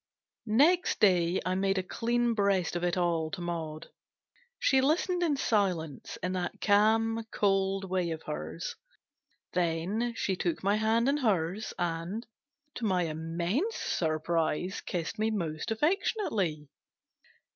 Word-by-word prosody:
NEXT 300 +12 +3
day 180 -3 +4
I 185 - +1
made 195 +1 +1
a 185 - 0
clean 240 +4 0
breast 200 -5 +1
of 175 - -2
it 175 0 +1
all 170 -3 +1
to 190 - -6
Maud. 160 -3 -5 0.7
She 265 -1 +3
listened 345 +6 +1
in 310 -5 +2
silence, 180 - -1
in 180 - 0
that 180 -1 -3
calm, 225 +2 +3
cold 195 -1 +1
way 180 -2 0
of 160 -1 -5
hers; 160 +3 -5 0.8
then 180 +7 0
she 195 - 0
took 175 -1 -2
my 200 +2 +3
hand 225 +2 +2
in 280 +1 +3
hers, 205 - 0
and, 175 +6 -2 0.5
to 235 - -4
my 185 -4 +2
immense 170 - -1
surprise, 165 +2 -1
kissed 180 +4 -4
me 220 +1 +2
most 165 -5 -3
affectionately. 220 - 0
190 Hz, 135 wpm, -30 LUFS, 170-225 Hz, 0.8 s, day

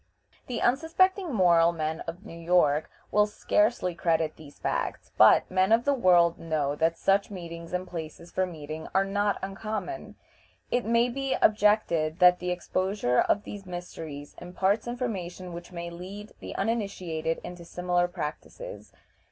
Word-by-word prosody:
The 245 - -3
unsuspecting 335 +7 +2
moral 170 -6 +5
men 160 0 -2
of 175 +5 -7
New 215 - -9
York 165 -3 +2 0.2
will 210 0 +4
scarcely 210 -2 +1
credit 165 -2 0
these 150 -2 -14
facts, - - -3
but - - +7
men 185 +2 +2
of 230 +2 +4
the 285 - +3
world 175 -8 +4
know 150 -3 -1
that 165 +1 +1
such 195 +1 +2
meetings 170 -3 -8
and 180 +1 -2
places 170 0 -7
for 185 0 0
meeting 155 -2 -7
are 195 0 +4
not 205 +1 0
uncommon. 215 - -5 0.6
It 245 - +1
may 235 +2 +3
be 270 +2 -1
objected 205 -7 +3
that 180 -1 +6
the 180 - -3
exposure 180 -5 0
of 205 - +2
these 200 -2 -8
mysteries 160 -5 -7
imparts 190 +5 0
information 190 -8 -4
which 170 +1 -9
may 170 -1 -6
lead 195 +5 -8
the - - -8
uninitiated 185 -7 -2
into 175 -1 -8
similar 175 +1 0
practices. 175 - -7
180 Hz, 150 wpm, -28 LUFS, 165-210 Hz, 0.6 s, but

